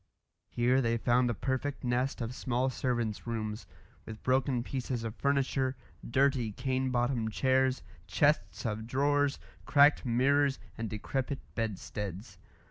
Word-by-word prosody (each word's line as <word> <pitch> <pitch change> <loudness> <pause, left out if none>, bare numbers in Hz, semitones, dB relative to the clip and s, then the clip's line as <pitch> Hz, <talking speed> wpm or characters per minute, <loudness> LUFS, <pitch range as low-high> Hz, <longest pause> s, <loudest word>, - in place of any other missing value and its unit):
Here 125 +2 +2
they 115 -1 +1
found 120 +2 +2
a 120 - -1
perfect 135 +5 -2
nest 125 +2 0
of 115 +1 -3
small 130 0 0
servants' 120 -4 -2
rooms, 110 -1 -4 0.4
with 110 -1 -9
broken 130 -1 +1
pieces 125 -2 -3
of 115 0 -4
furniture, 135 -1 +1 0.3
dirty 130 -2 +2
cane 130 +2 -1
bottomed 120 -3 0
chairs, 130 0 +2 0.2
chests 145 - +1
of 110 0 -3
drawers, 145 +2 +2 0.3
cracked 145 0 +5
mirrors, 135 +3 +2 0.2
and 115 -1 -4
decrepit 130 +6 -3 0.2
bedsteads. 105 -2 -4
125 Hz, 130 wpm, -31 LUFS, 115-135 Hz, 0.4 s, cracked